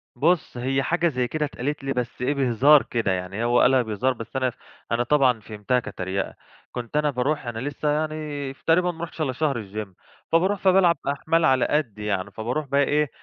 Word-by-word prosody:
بُص، 160 -1 +1
هي 135 +2 0
حاجة 170 +2 +1
زي 125 -5 0
كده 155 +2 -1
اتقالت 140 +1 -4
لي 135 0 -1
بس 125 0 -4
إيه، 130 +3 +1
بهزار 135 +2 +5
كده. 115 -5 -1
يعني 95 +4 -3
هو 120 +1 +3
قالها 130 0 +5
بهزار، 115 +4 0
بس 115 +2 -10
أنا 130 -1 +1
ف - - -13 0.4
أنا 120 +1 +2
طبعًا 130 -4 +3
فهمتها 105 +4 -1
كتريقة. 95 -3 -4 0.4
كنت 125 +4 -4
أنا 150 0 +2
باروح 135 +2 -1
أنا 115 -1 -4
لسّه 145 +3 -2
يعني 150 -2 -2
تقريبًا 175 +5 +2
ما 165 0 -8
رُحتش 165 -1 -6
إلّا 135 -4 0
شهر 145 0 0
الgym، 105 +1 -6 0.4
فباروح 190 +5 +2
فبالعب 185 -3 +4
أحمال 160 +3 +1
على 130 -1 +4
قَدّي 115 -9 -1
يعني، 95 -3 -2
فابروح 125 +7 -3
بقي 140 +1 +3
إيه، 150 0 +1
135 Hz, 195 wpm, -24 LUFS, 120-150 Hz, 0.4 s, بهزار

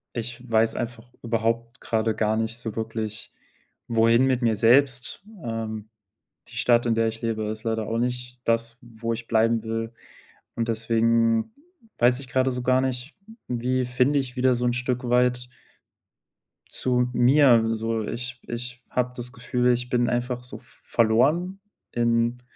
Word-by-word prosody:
ich 120 +1 -5
weiß 115 0 +3
einfach 120 0 -5
überhaupt 115 +1 -1
grade 110 -1 0
gar 110 0 +1
nicht 115 +1 -2
so 110 -4 -4
wirklich, 110 -1 -4 0.5
wohin 115 +2 +4
mit 130 -1 +1
mir 115 -2 +3
selbst. 130 - +3 0.2
Ähm, 110 -2 -4 0.6
die - - -11
Stadt, 120 -1 +3
in 120 - +2
der 115 0 +2
ich 115 0 -5
lebe, 115 -2 -1
ist 110 +1 -5
leider 110 -1 -1
auch 115 - -1
nicht 125 +1 -3
das, 115 0 0
wo 115 -1 -5
ich 115 0 -7
bleiben 115 0 +2
will, 115 0 -3 0.6
und 115 0 -1
deswegen 115 - +2 0.5
weiß 125 +1 +4
ich 135 - -10
grade 130 +1 +2
so 125 0 -4
gar 130 +1 +3
nicht, 130 +2 -3 0.3
wie 125 +1 0
finde 125 +4 +2
ich 130 -2 -4
wieder 130 0 +3
so 125 +1 -1
'n 120 - +2
Stück 125 0 -2
weit 125 0 +2 1.2
zu 125 -1 +1
mir. 125 -1 +5
So, 115 0 -1
ich 125 +2 -5
ich 125 +1 -6
habe 125 0 0
das 125 0 -4
Gefühl, 125 +1 +1
ich 125 0 -2
bin 120 -1 +2
einfach 125 0 -2
so 125 - -7
v - - -23 0.2
verloren 145 - +2 0.3
in 120 +1 +1
120 Hz, 160 wpm, -25 LUFS, 115-125 Hz, 1.2 s, mir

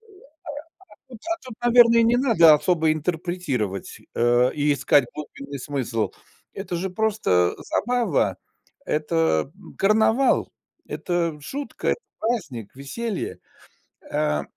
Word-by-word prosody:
А 430 -4 -21 0.9
тут, 240 -4 -11
а 335 - 0
тут, 255 -4 -9 0.2
наверно, 235 -1 +7
не 235 +2 +3
надо 220 - +6
особо 160 0 +2
интерпретировать, 155 - -3 0.2
э, 120 +1 +3
и 145 0 +2
искать 140 -1 +3
глубинный 140 -2 -8
смысл. 125 -5 -2 0.4
Это 190 -2 -5
же 185 +3 -2
просто 185 - +1
забава, 245 +2 +1 0.5
это, 155 - 0
эм, 200 - -15
карнавал, 220 +6 +3 0.4
это 170 -4 -2
шутка, 280 - -4
это - - -1 0.2
праздник, 145 - -3
веселье. 195 - -4 0.7
Э, 75 -1 0
170 Hz, 110 wpm, -23 LUFS, 140-220 Hz, 0.9 s, наверно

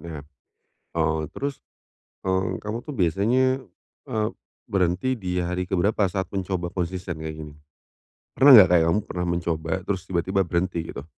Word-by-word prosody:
Nah, 80 -4 -8 0.7
eee, 80 -1 +1
terus, 140 0 -4 0.6
eee, 95 -1 0
kamu 105 +5 -5
tuh 150 - -4
biasanya, 120 +9 +2 0.5
eee, 110 -4 0 0.4
berhenti 95 +6 +1
di 90 -5 -4
hari 90 +1 -2
keberapa 100 +2 +1
saat 95 0 -3
mencoba 95 -2 -3
konsisten 90 -2 -4
kayak 80 0 -5
gini? 75 -1 -9 0.8
Pernah 135 0 +8
nggak 100 -6 +9
kayak 85 -2 +5
kamu 85 +5 +3
pernah 90 -4 -4
mencoba 85 -2 -2
terus 95 -2 -2
tiba-tiba 95 +1 0
berhenti 85 0 -1 0.2
gitu? 70 - -6
90 Hz, 145 wpm, -24 LUFS, 85-100 Hz, 0.8 s, nggak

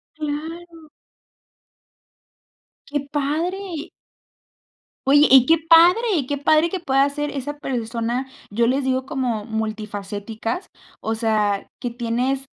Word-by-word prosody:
Claro. 320 +2 -6 2.0
¡Qué 290 0 -1
padre! 325 +4 -2 1.2
Oye, 290 +2 +6
y 260 -2 +8
qué 325 - +5
padre 350 - +5
qué 285 +1 -1
padre 310 +4 +3
que 375 - -3
puedas 275 -1 +2
ser 295 0 -2
esa 290 +1 -5
persona, 235 0 -2 0.2
yo 230 +3 +2
les 265 +3 +1
digo 260 0 0
como 240 -6 -2
multifacéticas. 215 - -4 0.3
O 225 - -1
sea, 215 -3 0
que 245 - -3
tienes 245 +3 -1
270 Hz, 110 wpm, -22 LUFS, 230-305 Hz, 2.0 s, y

